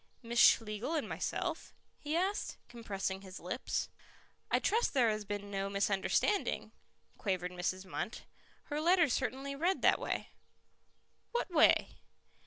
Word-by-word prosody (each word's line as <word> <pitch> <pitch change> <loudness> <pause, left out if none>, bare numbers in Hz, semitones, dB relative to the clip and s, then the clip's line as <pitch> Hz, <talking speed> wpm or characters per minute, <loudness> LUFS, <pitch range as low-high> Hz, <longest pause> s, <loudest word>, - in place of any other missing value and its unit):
"Miss 235 +1 -1
Schlegel 225 +8 +4
and 305 - -1
myself." - - -3 0.2
he 300 +2 -3
asked, 380 +4 -1
compressing 195 -5 -4
his 190 -1 -9
lips. 180 +9 -2 0.6
"I - - +4
trust 455 -6 +1
there 240 -4 +4
has 215 -1 -3
been 205 0 -5
no 195 0 -2
misunderstanding," 200 - +1 0.5
quavered 185 -3 -1
Mrs. 185 +1 -2
Munt. 200 +5 -4 0.4
"Her 295 0 -3
letter 340 0 +5
certainly 270 +3 -2
read 350 +6 0
that - - +5
way." - - -3 1.0
"What 475 -5 -1
way?" 315 -2 +5
230 Hz, 130 wpm, -33 LUFS, 195-305 Hz, 1.0 s, letter